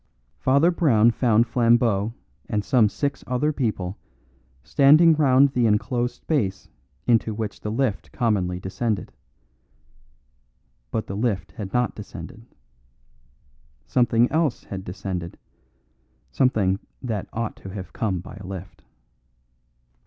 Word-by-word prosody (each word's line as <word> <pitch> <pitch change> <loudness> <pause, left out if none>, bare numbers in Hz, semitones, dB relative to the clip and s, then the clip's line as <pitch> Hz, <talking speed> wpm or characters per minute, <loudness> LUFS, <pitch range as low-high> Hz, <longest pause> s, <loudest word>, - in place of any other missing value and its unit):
Father 140 +7 +4
Brown 120 -10 +4
found 115 -1 +3
Flambeau 115 -3 +2 0.3
and 105 -1 -1
some 115 -5 +4
six 140 +6 -3
other 135 +5 0
people 105 -8 -2 0.6
standing 150 - +6
round 140 -2 +4
the 125 -3 +1
enclosed 120 +3 0
space 100 - -2 0.4
into 115 -2 +2
which 110 -1 -4
the 105 - -4
lift 115 -3 -1
commonly 95 -6 0
descended. 100 +3 -3 1.8
But 110 - -2
the 100 - -6
lift 105 -2 -1
had 100 -3 -7
not 125 -1 +1
descended. 105 +2 -10 1.4
Something 120 -1 +3
else 155 -5 0
had 95 -1 -7
descended; 90 -2 -5 0.9
something 100 - +2 0.2
that 110 -6 -3
ought 115 -1 -3
to 95 - -10
have 95 -1 -8
come 95 -6 -1
by 95 - -11
a 95 - -9
lift. 95 -1 -9
115 Hz, 115 wpm, -24 LUFS, 100-125 Hz, 1.8 s, standing